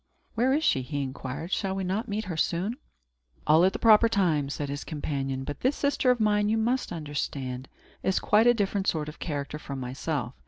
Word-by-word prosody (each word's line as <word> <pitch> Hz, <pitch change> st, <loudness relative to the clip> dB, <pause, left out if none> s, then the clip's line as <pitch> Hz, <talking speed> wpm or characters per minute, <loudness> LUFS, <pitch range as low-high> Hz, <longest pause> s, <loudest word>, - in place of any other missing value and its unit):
"Where 245 Hz, +3 st, +2 dB
is 300 Hz, +4 st, +2 dB
she?" 135 Hz, -, +3 dB
he 145 Hz, +2 st, -3 dB
inquired. 135 Hz, +5 st, -6 dB
"Shall 195 Hz, -2 st, 0 dB
we 195 Hz, -, -2 dB
not 195 Hz, +6 st, -2 dB
meet 215 Hz, +1 st, -3 dB
her 180 Hz, -3 st, -4 dB
soon?" 180 Hz, +9 st, -1 dB, 0.7 s
"All 155 Hz, +3 st, +5 dB
at 190 Hz, -, +5 dB
the -, -, -4 dB
proper 225 Hz, 0 st, +6 dB
time," 160 Hz, -10 st, +1 dB
said 145 Hz, 0 st, -3 dB
his 140 Hz, +1 st, -4 dB
companion. 135 Hz, -3 st, -3 dB
"But 145 Hz, +2 st, -6 dB
this 265 Hz, +3 st, +1 dB
sister 280 Hz, -2 st, +1 dB
of 250 Hz, -1 st, +3 dB
mine, 210 Hz, -1 st, +2 dB
you 220 Hz, -, +2 dB
must 240 Hz, +4 st, 0 dB
understand, 135 Hz, -4 st, -4 dB, 0.3 s
is 190 Hz, -, +1 dB
quite 215 Hz, +3 st, +4 dB
a 240 Hz, -, +7 dB
different 200 Hz, -2 st, -1 dB
sort 155 Hz, -2 st, 0 dB
of 150 Hz, -, -12 dB
character 145 Hz, -1 st, -4 dB
from 140 Hz, -2 st, -6 dB
myself. 130 Hz, +1 st, -3 dB
170 Hz, 205 wpm, -27 LUFS, 145-215 Hz, 0.7 s, a